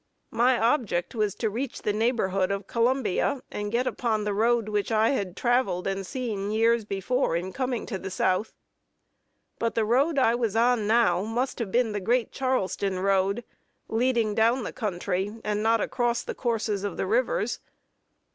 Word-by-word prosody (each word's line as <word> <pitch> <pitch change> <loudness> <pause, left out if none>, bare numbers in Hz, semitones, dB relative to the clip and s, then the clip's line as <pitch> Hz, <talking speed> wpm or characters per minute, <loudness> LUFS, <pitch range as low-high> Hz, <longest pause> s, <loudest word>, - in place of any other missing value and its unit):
My 245 +2 +3
object 225 -7 0
was 210 -3 0
to 220 +1 -1
reach 245 +4 -4
the 210 - 0
neighborhood 205 -4 +1
of 200 0 -2
Columbia, 250 +2 0
and 205 0 -4
get 240 +2 +1
upon 225 -4 -1
the 210 -1 -1
road 230 +1 +2
which 210 0 -1
I 220 0 +3
had 195 -9 -2
traveled 240 -7 +1
and 195 0 -2
seen 215 -6 -3
years 225 +1 +2
before 200 +1 0
in 180 +2 -3
coming 255 -2 -2
to 195 -5 -4
the 190 - -6
South; 185 +2 0 1.1
but 230 0 -1
the 225 - +2
road 275 +8 +2
I 245 -4 +4
was 230 -3 -1
now 225 -5 +3
on 205 - -4
must 245 +4 -2
have 220 -5 -3
been 240 0 +2
the 205 - -2
great 235 +5 +1
Charleston 200 -7 -1
road, 195 +4 +1 0.5
leading 230 -2 +1
down 230 +4 +2
the - - -5
country, 195 -1 -2
and 210 0 -1
not 225 0 +3
across 240 -2 0
the - - -5
courses 225 -4 -1
of 200 -4 -3
the - - -1
rivers. 235 +2 0
225 Hz, 175 wpm, -26 LUFS, 200-240 Hz, 1.1 s, I